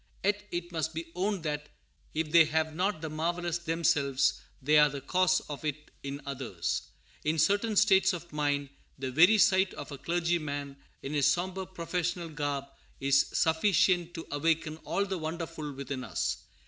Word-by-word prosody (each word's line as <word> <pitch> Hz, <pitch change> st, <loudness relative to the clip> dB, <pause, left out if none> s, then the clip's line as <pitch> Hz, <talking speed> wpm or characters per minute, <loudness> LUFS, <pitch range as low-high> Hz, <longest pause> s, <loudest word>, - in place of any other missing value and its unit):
Yet 205 Hz, +1 st, 0 dB
it 175 Hz, 0 st, -4 dB
must 160 Hz, -1 st, -2 dB
be 165 Hz, 0 st, -5 dB
owned 190 Hz, 0 st, -1 dB
that, 150 Hz, -1 st, -3 dB, 0.5 s
if 155 Hz, -1 st, -1 dB
they 165 Hz, -1 st, +8 dB
have 160 Hz, 0 st, 0 dB
not 185 Hz, 0 st, -1 dB
the 160 Hz, -, -4 dB
marvellous 170 Hz, +2 st, -1 dB
themselves, 160 Hz, -5 st, +1 dB, 0.2 s
they 150 Hz, +3 st, +4 dB
are 150 Hz, 0 st, +6 dB
the 140 Hz, 0 st, -5 dB
cause 185 Hz, +4 st, +2 dB
of 145 Hz, 0 st, -8 dB
it 150 Hz, 0 st, -4 dB
in 140 Hz, +1 st, -5 dB
others. 125 Hz, -11 st, -3 dB, 0.4 s
In 155 Hz, +2 st, 0 dB
certain 205 Hz, +7 st, +2 dB
states 190 Hz, -2 st, +5 dB
of 170 Hz, -3 st, -7 dB
mind, 145 Hz, -2 st, 0 dB, 0.3 s
the 130 Hz, -1 st, -4 dB
very 175 Hz, -, +6 dB
sight 190 Hz, -2 st, +4 dB
of -, -, -8 dB
a 140 Hz, -, -7 dB
clergyman 155 Hz, -4 st, -1 dB, 0.3 s
in 140 Hz, -, -4 dB
his 145 Hz, -3 st, +3 dB
sombre 185 Hz, +1 st, -2 dB
professional 175 Hz, -1 st, -3 dB
garb 145 Hz, -2 st, -2 dB, 0.3 s
is 140 Hz, 0 st, +3 dB
sufficient 175 Hz, +1 st, +2 dB
to 165 Hz, -, -6 dB
awaken 160 Hz, +1 st, 0 dB
all 200 Hz, -, 0 dB
the 190 Hz, -2 st, -3 dB
wonderful 160 Hz, -1 st, -4 dB
within 135 Hz, -1 st, -5 dB
us. -, -, -1 dB
160 Hz, 165 wpm, -30 LUFS, 145-175 Hz, 0.5 s, they